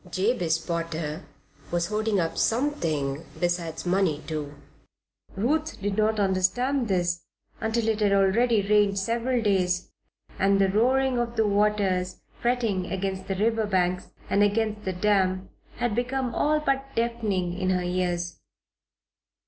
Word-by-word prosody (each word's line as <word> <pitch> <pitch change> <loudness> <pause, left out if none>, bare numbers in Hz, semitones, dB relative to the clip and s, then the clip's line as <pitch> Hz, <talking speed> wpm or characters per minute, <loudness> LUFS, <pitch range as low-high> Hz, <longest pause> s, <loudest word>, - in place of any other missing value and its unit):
Jabez 185 -4 +1
Potter 165 -1 -4 0.4
was 170 0 0
hoarding 215 -1 0
up 165 -2 -1
something 165 - 0 0.2
besides 175 -2 -2
money, 175 -4 +1
too. 150 -2 -4 0.8
Ruth 305 +10 0
did 200 0 -2
not 215 +1 +2
understand 215 +7 +1
this 175 -3 0 0.4
until 225 0 0
it 220 -1 +1
had 205 -2 +3
already 200 +2 +3
rained 205 -1 +3
several 235 +4 0
days, 180 -3 +1 0.5
and 195 +1 +4
the 195 -1 +4
roaring 255 +5 +2
of 235 0 -2
the 220 - +2
waters 200 -3 +1 0.2
fretting 230 -7 0
against 190 0 -3
the 195 - -1
river 220 +2 +1
banks 180 -2 0 0.2
and 200 - +2
against 210 +1 +1
the 190 - -1
dam, 185 -1 +1 0.3
had 240 -2 -1
become 250 +1 -1
all 305 +4 +2
but 275 -2 0
deafening 220 -7 -1
in 185 0 -1
her 180 -1 +1
ears. 175 -1 -2
200 Hz, 135 wpm, -26 LUFS, 180-230 Hz, 0.8 s, and